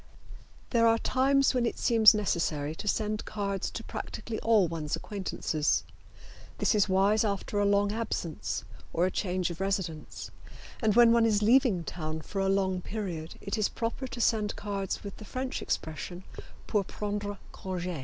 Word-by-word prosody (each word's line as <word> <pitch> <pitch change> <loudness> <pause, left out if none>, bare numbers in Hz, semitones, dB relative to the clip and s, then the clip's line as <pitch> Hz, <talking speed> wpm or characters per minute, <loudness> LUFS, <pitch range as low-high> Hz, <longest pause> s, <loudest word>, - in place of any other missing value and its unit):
There 230 -2 +4
are 225 0 +5
times 275 +3 +3
when 250 -2 +1
it - - -3
seems 225 -2 +6
necessary 160 -7 0
to 210 - -7
send 215 +1 0
cards 200 -2 -3
to - - -6
practically 225 -2 -5
all 220 -5 +4
one's 155 -2 -2
acquaintances, 185 -6 -1 0.7
This - - +2
is 210 -2 +3
wise 200 +3 +3
after 205 0 -1
a 205 - +3
long 200 0 +3
absence 210 -7 -3 0.3
or 170 - +2
a 185 - 0
change 180 -2 -1
of 170 +2 -7
residence, 190 -6 -3 0.5
and 215 -3 +2
when 235 -1 +7
one 230 -1 +4
is 210 -1 +2
leaving 235 -6 +4
town 155 -1 -4
for 195 +6 -5
a 195 - +1
long 190 -2 +1
period 180 -6 -5
it 200 +3 -3
is 210 - +2
proper 235 +3 -3
to 250 - -7
send 215 -3 +1
cards 200 -2 -3
with 200 -2 -7
the - - -10
French 255 +5 -4
expression, 175 +3 -4 0.4
"Pour 210 -3 +1
prendre 205 +1 -4
conge." 180 -3 -4
205 Hz, 165 wpm, -29 LUFS, 180-220 Hz, 0.7 s, when